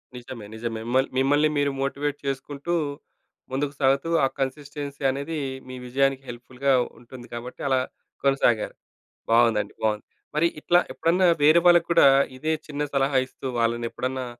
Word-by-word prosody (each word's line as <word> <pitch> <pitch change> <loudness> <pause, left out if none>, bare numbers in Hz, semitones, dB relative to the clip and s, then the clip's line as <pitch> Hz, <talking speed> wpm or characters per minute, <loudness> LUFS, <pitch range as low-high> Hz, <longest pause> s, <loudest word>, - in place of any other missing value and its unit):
నిజమే. 120 -3 -8
నిజమే. 115 0 -4
మళ్ 130 +1 +3
మిమ్మల్ని 145 +3 +3
మీరు 145 -1 +2
మోటివేట్ 140 +1 -2
చేసుకుంటూ, 140 +4 -3 0.8
ముందుకు 140 +2 -1
సాగుతూ, 135 +3 +2 0.2
ఆ - - +3
కన్సిస్‌టెన్సీ 140 +1 -4
అనేది 140 +4 -4 0.3
మీ 130 - -7
విజయానికి 135 +1 +1
హెల్ప్ 120 +1 -8
ఫుల్‌గా 135 +2 +1 0.3
ఉంటుంది 120 +1 -12
కాబట్టి 120 +2 -7
అలా 130 -1 +3 0.4
కొనసాగారు. 135 -5 +2 0.6
బాగుందండి. 115 -3 +3
బాగుంది. 105 -1 0 0.3
మరి 155 +3 +3
ఇట్లా 175 +3 +4
ఎప్పుడన్నా 180 +3 +2 0.2
వేరే 155 +3 +7
వాళ్ళకూడా 170 -2 +6 0.3
ఇదే 155 +4 -1
చిన్న 150 -1 -4
సలహా 135 0 +2
ఇస్తూ 130 - -10
వాళ్ళనేప్పుడన్నా, 120 +2 -1
135 Hz, 135 wpm, -25 LUFS, 125-145 Hz, 0.8 s, వేరే